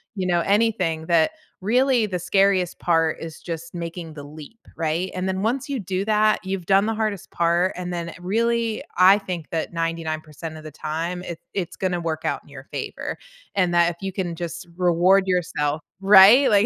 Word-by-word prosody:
you 185 -2 -2
know, 175 -1 +2
anything, 195 -5 +1
that 170 - +3 0.3
really 245 +2 +3
the 185 -2 -2
scariest 190 0 +2
part 165 -2 +2
is 165 -1 -7
just 165 0 -7
making 170 -1 -6
the 145 - -8
leap, 155 +9 -11 0.2
right? 165 +3 -1
And 185 +1 -2
then, 190 +1 -2
once 250 +5 -1
you 275 -3 -2
do 190 0 -2
that, 215 0 +3
you've 190 -2 -4
done 195 +1 +4
the 225 - -1
hardest 215 -4 -2
part, 170 +2 +1
and 180 0 -5
then 170 -1 -4
it - - -10
really 230 +3 0
I 190 +3 +7
think 180 -5 -6
that 165 0 -2
99% 160 -1 -4
of 155 - -11
the 155 - -7
time, 165 +5 -4
it 170 -2 -7
it's 180 -4 -3
gonna 180 -2 -1
work 160 -1 -3
out - - -1
in - - -21
your - - -10
favor, - - -4 0.4
and 180 -3 +2
that 170 0 +4
if 170 - -12
you 195 - -3
can 175 -3 -3
just 170 0 -6
reward 180 +2 +4
yourself. 165 -4 0 0.2
Right? 205 +7 +8
Like, 205 0 +4
180 Hz, 195 wpm, -23 LUFS, 165-195 Hz, 0.4 s, Right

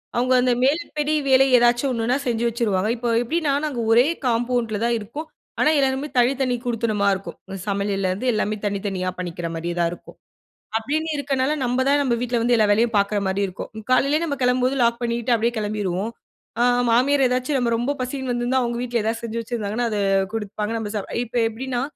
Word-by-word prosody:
அவுங்க 250 +2 +2
அந்த 250 0 +2
மேல்ப்படி 300 +1 0
வேல 265 0 +6
ஏதாச்சும் 240 +3 +3
ஒன்னுன்னா 235 +2 0
செஞ்சு 235 -2 0
வச்சுருவாங்க. 215 -4 0
இப்போ 240 0 -3
எப்பிடின்னா, 295 +4 0
நாங்க 280 -5 -3
ஒரே 240 +3 +6 0.2
காம்பவுண்ட்ல 235 -2 0
தான் 235 0 +2
இருக்கோம். 235 +9 -7 0.3
ஆனா - - +4
எல்லாருமே 270 +1 0
தனித்தனி 255 +1 +2
குடித்தனமா 225 -4 0
இருக்கும். 195 0 -6
இந்த 195 - -5
சமையல்ல 200 -1 -1
இருந்து 200 +8 -3
எல்லாமே 215 0 0
தனித்தனியா 195 -2 -2
பண்ணிக்கிறமாரியே 170 -1 -4
தான் 170 -1 +2
இருக்கோம். 175 - -11 0.6
அப்பிடின்னு 305 +8 -2
இருக்கனால 275 -1 0
நம்ம 250 +1 +1
தான் 285 +1 +4
நம்ம 250 -3 +1
வீட்ல 245 -1 0
வந்து 240 +1 +3
எல்லா 215 - +4
வேலையும் 225 +2 +2
பார்க்குறமாரி 200 -1 0
இருக்கும். 185 +1 -7 0.2
காலையிலேயே 285 +5 +3
நம்ம 290 -4 -2
கிளம்பும்போது 250 +1 +2
லாக் 235 0 +2
பண்ணிட்டு 235 +1 0
அப்பிடியே 230 +1 0
கிளம்பிருவோம். 205 -1 -2 0.5
அ - - +5 0.3
மாமியார் 270 +4 +3
ஏதாச்சும் 255 +3 0
நம்ம 240 -2 0
ரொம்ப 240 +4 -1
பசிக்கிதுன்னு 255 0 -3
வந்திருந்தா, 240 +2 +1
அவுங்க 235 0 -2
வீட்ல 240 -2 -1
ஏதாவது 225 +1 -2
செஞ்சு 230 0 -3
வச்சிருந்தாங்கன்னா, 230 0 -3
அத 210 - -1 0.3
குடுப்பாங்க, 210 0 -3
நம்ம 210 -2 -4
சாப் 205 - -4 0.2
இப்ப 240 +1 -5
எப்பிடின்னா, 245 +2 -3
235 Hz, 175 wpm, -22 LUFS, 210-255 Hz, 0.6 s, வேல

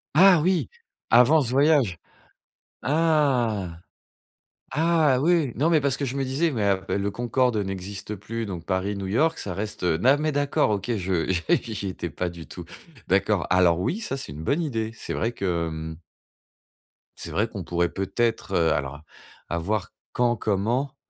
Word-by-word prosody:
Ah 180 0 +7
oui, 180 +2 +1 0.4
avant 125 +7 +6
ce 125 - -2
voyage? 135 - +3 0.9
Ah! 130 - +1 0.9
Ah 155 -3 +3
oui, 160 -4 +2
non 150 +7 +1
mais 160 -2 +4
parce 135 -2 +1
que 145 - -2
je 135 0 -3
me 135 - 0
disais: 140 +6 0
«Mais 115 -7 -1
a 95 -1 +1
mais - - 0
le 100 +1 -1
Concorde 120 +2 +1
n'existe 100 +1 -5
plus, 115 +4 -5
donc 90 -4 -6
Paris-New 100 +1 -2
York, 155 +12 +1
ça 95 - -4
reste, 105 0 -5
heu». 85 -3 +2
Non 130 +9 +4
mais 155 +1 0
d'accord. 145 -5 +1
OK 105 +3 -2
je 90 -3 -1 0.2
j'y 110 - +1
j'y 100 - -4
étais 85 -2 -5
pas 90 - -3
du 85 -1 -10
tout. 90 - -8 0.4
D'accord. 100 +1 +1
Alors 90 -2 +4
oui, 165 - -1
ça, 175 -11 -3
c'est 130 - -6
une 75 +2 -8
bonne 140 - 0
idée. 115 -9 -2
C'est - - -6
vrai 115 - 0
que, 90 -7 -2
mmh 80 0 -6 1.2
c'est - - -8
vrai - - +1
qu'on - - -7
pourrait 85 0 0
peut-être, 115 +5 -1
heu, 80 -1 +3
alors, 70 +2 -4 0.5
à 85 - -1
voir 100 +3 -2 0.2
quand, 120 -1 +2
comment. 115 +7 -1
110 Hz, 175 wpm, -25 LUFS, 95-140 Hz, 1.2 s, Ah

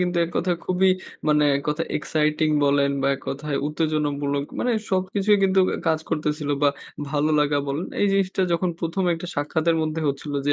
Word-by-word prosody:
কিন্তু 180 -1 0
এক 165 - -6
কথা 180 0 +1
খুবই 185 +1 +3 0.4
মানে 150 0 +4
এক 140 - -4
কথায় 150 - -1
এক্সাইটিং 155 +1 0 0.2
বলেন 140 0 +3
বা 135 - +2
এক - - -9
কথায় 145 +1 -3
উত্তেজনামূলক 145 -2 -1
মানে 245 - +1 0.2
সবকিছুই 195 +2 +2
কিন্তু 190 0 +3
অ্যা - - -2
কাজ 160 - +2
করতেছিল 150 -2 -1
বা 145 - +6 0.4
ভালো 150 +1 +1
লাগা 145 0 +2
বলেন 150 +6 -2
এই 205 - +4
জিনিসটা 190 -1 +1
যখন 175 +2 +1
১ম 170 +3 -1
একটা 165 +2 -7
সাক্ষাতের 160 +3 0
মধ্যে 155 +1 -2
হচ্ছিলো। 140 +1 -3
যে 145 - +4
155 Hz, 185 wpm, -23 LUFS, 145-180 Hz, 0.4 s, বা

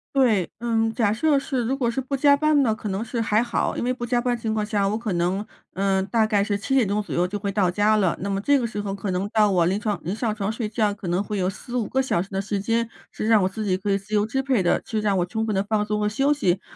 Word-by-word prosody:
对， 220 -10 +3
嗯， 225 -1 +1
假 220 -4 +1
设 285 +6 +2
是 270 -2 -1
如 260 +4 0
果 240 -4 0
是 265 - -2
不 265 +2 -2
加 285 +1 +5
班 305 -1 +3
呢， 225 -4 +2
可 215 - -6
能 195 +2 -2
是 230 +1 -4
还 225 0 +2
好。 235 - -1
因 - - -2
为 250 - +1
不 240 -1 -5
加 240 +1 +1
班 245 -1 0
情 225 -1 -2
况 215 -1 -1
下， 205 -2 0
我 210 - 0
可 225 -3 -4
能， 180 +4 0 0.3
嗯， 195 0 +1
大 220 +2 +2
概 210 -2 +2
是 205 0 0
7 270 +7 -3
点 250 -7 +4
钟 210 +1 0
左 - - -7
右 175 +1 +1
就 205 +3 -4
会 200 0 -3
到 195 -2 +2
家 210 +4 +2
了， 190 -5 +1
那 200 - -3
么 195 - -1
这 285 +8 +3
个 250 - -1
时 215 -2 -4
候， 200 -1 -3
可 195 -1 -4
能 185 +2 -1
到 210 -2 +4
我 175 -3 +3
临 185 +3 +1
床 210 -1 -2
临 185 - -2
上 220 -1 -1
床 205 -1 -3
睡 220 -1 -3
觉， 210 -2 +1
可 195 -3 -6
能 175 +2 +1
会 205 0 -4
有 185 0 +1
4-5 240 +2 -4
个 265 - +1
小 260 -10 0
时 190 - -7
的 195 0 -2
时 200 0 -3
间， 230 +2 0 0.2
是 215 - -4
让 220 -4 +5
我 185 - +1
自 215 +2 -5
己 190 -2 +1
可 200 +2 -2
以 195 - +3
自 200 +2 -11
由 205 0 +3
支 265 +5 -1
配 255 -7 +1
的， 175 - +2
就 220 -2 -2
让 205 -2 +1
我 175 - +1
充 220 +5 -2
分 215 - -1
地 195 - +1
放 210 0 0
松 210 0 -1
和 210 - +1
休 270 +7 +1
息。 190 -11 +1
215 Hz, 325 characters per minute, -24 LUFS, 195-235 Hz, 0.3 s, 加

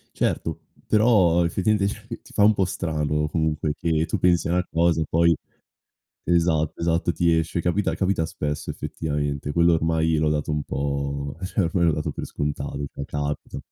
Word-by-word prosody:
Certo. - - -1 0.3
Però 100 -6 +4
effettivamente 100 +4 +1
cioè 110 +1 -9
ti - - -18
fa 105 - +2
un 105 +1 +7
po' 100 -2 +1
strano, 75 -4 -1
comunque, 75 -1 -1
che 80 0 0
tu - - -2
pensi 85 -3 +2
a - - 0
una 90 0 +1
cosa 85 0 +2
e - - 0
poi 85 0 +3 0.9
esatto, 80 -3 +1
esatto 85 +1 +1
ti 85 +1 +2
esce 80 +2 -1
capita 90 +4 0
capita 95 -4 0
spesso 75 -2 -4
effettivamente, 75 -2 -3
quello 85 +1 +4
ormai 80 0 +1
l'ho 75 0 +2
dato 75 0 -1
un 75 -1 -1
po' 70 0 -3
cioè 95 +2 0
ormai 85 +1 +1
l'ho 80 - +4
dato 75 0 -2
per - - -6
scontato 70 -1 -3
cioè 70 - -5
capita. 75 +1 -4
80 Hz, 175 wpm, -24 LUFS, 75-85 Hz, 0.9 s, un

